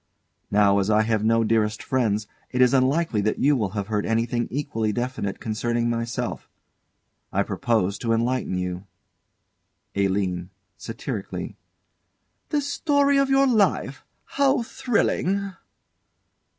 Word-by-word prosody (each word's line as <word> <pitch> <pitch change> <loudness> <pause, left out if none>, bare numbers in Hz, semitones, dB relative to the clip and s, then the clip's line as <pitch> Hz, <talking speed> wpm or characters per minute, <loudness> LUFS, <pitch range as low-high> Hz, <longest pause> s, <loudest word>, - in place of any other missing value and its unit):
Now, 100 -1 +4
as 100 +1 0
I 110 0 +4
have 110 -1 0
no 115 +1 +3
dearest 110 -1 +1
friends, 110 -6 0 0.2
it 125 - -3
is 125 +1 +5
unlikely 135 -2 +2
that 105 +1 0
you 145 +1 +3
will 105 -6 0
have 100 - -1
heard 105 0 -1
anything 115 +1 0
equally 115 -5 -2
definite 120 -3 -3
concerning 120 +2 -1
myself. 115 0 -3 0.8
I - - +1
propose 100 -4 0
to 115 - -1
enlighten 115 -3 0
you. 90 +1 -4 1.1
ALINE. 95 -3 0 0.3
[Satirically.] - - -6 0.9
The 295 - +1
story 285 0 +2
of 275 0 +2
your 270 0 +4
life 220 -6 +1 0.2
how 275 -2 +2
thrilling! 200 -5 0
115 Hz, 125 wpm, -24 LUFS, 105-145 Hz, 1.1 s, is